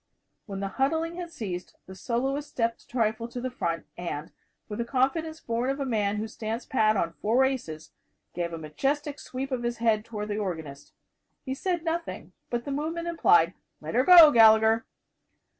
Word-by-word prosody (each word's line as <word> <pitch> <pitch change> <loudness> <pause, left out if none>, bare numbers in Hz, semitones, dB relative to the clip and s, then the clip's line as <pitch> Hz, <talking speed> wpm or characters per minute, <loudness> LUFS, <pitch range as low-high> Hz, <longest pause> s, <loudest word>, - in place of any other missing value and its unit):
When 195 -2 -5
the 200 - -1
huddling 320 +5 0
had 350 -1 -5
ceased, 185 - -6
the 190 - -10
soloist 265 +8 -2
stepped 230 -1 -1
a - - -24
trifle 230 -1 -1
to 240 +1 -7
the 255 +1 -3
front 170 -9 -3
and, 165 -3 -5 0.4
with 210 +1 -6
the - - +1
confidence 285 +6 0
born 235 0 -2
of 275 +1 -2
a 275 - -1
man 210 -5 0
who 215 +1 -3
stands 225 +1 -5
pat 215 -4 +2
on 170 -2 -1
four 235 +9 +2
aces, 160 -13 -4 0.4
gave 170 -1 -3
a 165 - -5
majestic 275 - -2
sweep 265 +2 -5
of 255 -2 -1
his 240 0 -2
head 225 -2 +2
toward 210 -2 -6
the 205 +1 -2
organist. 160 -8 -6 0.5
He 265 - -2
said 345 +4 -2
nothing, 335 +1 -4 0.2
but 240 -1 -2
the 280 - -4
movement 325 +4 -3
implied, 175 - +4 0.3
"Let 155 +5 -6
'er 255 - +4
go, 335 -2 +10
Gallagher." 220 -1 +6
235 Hz, 185 wpm, -27 LUFS, 205-275 Hz, 0.5 s, go